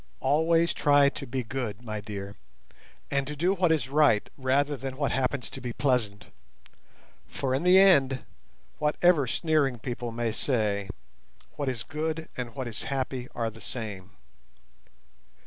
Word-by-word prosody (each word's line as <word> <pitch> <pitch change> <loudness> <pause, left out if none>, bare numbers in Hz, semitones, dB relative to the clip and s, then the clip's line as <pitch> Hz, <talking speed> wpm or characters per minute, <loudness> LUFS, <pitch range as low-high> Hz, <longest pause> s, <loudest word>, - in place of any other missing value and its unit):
Always 165 +4 +3
try 145 -1 +4
to 140 - -8
be 130 +1 -2
good, 120 -2 -4
my 110 -2 -4
dear, 100 -1 -7 0.8
and 140 -1 0
to 150 - -4
do 175 +6 +2
what 180 -3 +2
is 150 -6 +1
right, 140 -6 +3
rather 140 +2 +1
than 130 0 -6
what 140 -1 0
happens 130 -1 -1
to 135 - -8
be 120 -2 -4
pleasant, 115 -8 -1 1.0
for 130 -2 -2
in 135 - +1
the 180 +2 +6
end, 140 -9 +5 0.5
whatever 150 -1 +3
sneering 145 -2 +1
people 120 +1 -5
may 115 0 -1
say, 105 -5 -1 0.7
what 145 -2 -2
is 115 -3 -3
good 155 +2 -3
and 120 -3 -5
what 130 -2 -4
is 110 -4 -5
happy 130 -2 -2
are 115 -1 -1
the 115 +1 -14
same. 100 -5 -7
130 Hz, 150 wpm, -28 LUFS, 115-145 Hz, 1.0 s, the